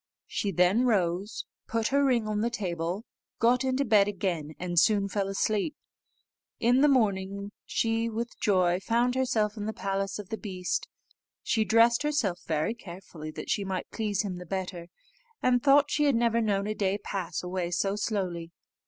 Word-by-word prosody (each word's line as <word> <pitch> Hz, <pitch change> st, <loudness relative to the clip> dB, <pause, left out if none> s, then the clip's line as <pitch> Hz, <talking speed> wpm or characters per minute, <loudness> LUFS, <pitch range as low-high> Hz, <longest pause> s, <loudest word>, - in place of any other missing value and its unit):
She 205 Hz, -, -2 dB
then 190 Hz, +8 st, +3 dB
rose, 190 Hz, -1 st, 0 dB, 0.2 s
put 225 Hz, -1 st, 0 dB
her 280 Hz, +1 st, +3 dB
ring 245 Hz, -5 st, +2 dB
on 210 Hz, -1 st, -1 dB
the 235 Hz, -, +1 dB
table, 180 Hz, -2 st, -3 dB, 0.3 s
got 240 Hz, +2 st, +3 dB
into 265 Hz, +1 st, +1 dB
bed 205 Hz, -3 st, +5 dB
again, 175 Hz, -7 st, -3 dB
and 175 Hz, -1 st, +1 dB
soon 200 Hz, +1 st, +3 dB
fell 200 Hz, 0 st, -1 dB
asleep. 210 Hz, +7 st, 0 dB, 0.8 s
In 245 Hz, +3 st, +4 dB
the 295 Hz, -, +6 dB
morning 200 Hz, -6 st, +1 dB, 0.2 s
she 225 Hz, 0 st, 0 dB
with 230 Hz, +1 st, -5 dB
joy 180 Hz, -3 st, +2 dB
found 235 Hz, +5 st, +1 dB
herself 230 Hz, -5 st, 0 dB
in 210 Hz, 0 st, -4 dB
the 220 Hz, -, -2 dB
palace 195 Hz, -1 st, -2 dB
of 210 Hz, -3 st, -8 dB
the 220 Hz, -, -4 dB
beast. 185 Hz, -4 st, -3 dB, 0.6 s
She 220 Hz, -2 st, +2 dB
dressed 230 Hz, +2 st, +4 dB
herself 285 Hz, -12 st, 0 dB
very 155 Hz, +7 st, 0 dB
carefully, 175 Hz, -7 st, -9 dB
that 155 Hz, -, -5 dB
she 205 Hz, -, +1 dB
might 190 Hz, -2 st, -4 dB
please 210 Hz, -3 st, -1 dB
him 185 Hz, -3 st, -4 dB
the 180 Hz, -, -8 dB
better, 185 Hz, -2 st, -4 dB, 0.5 s
and 250 Hz, -1 st, +2 dB
thought 285 Hz, +1 st, +5 dB
she 295 Hz, -, +2 dB
had 280 Hz, -3 st, +3 dB
never 230 Hz, 0 st, +2 dB
known 200 Hz, -3 st, +1 dB
a 215 Hz, -, -1 dB
day 200 Hz, -2 st, 0 dB
pass 185 Hz, -5 st, -4 dB
away 180 Hz, -1 st, -2 dB
so 195 Hz, +3 st, 0 dB
slowly. 185 Hz, -6 st, -2 dB
205 Hz, 175 wpm, -28 LUFS, 185-230 Hz, 0.8 s, the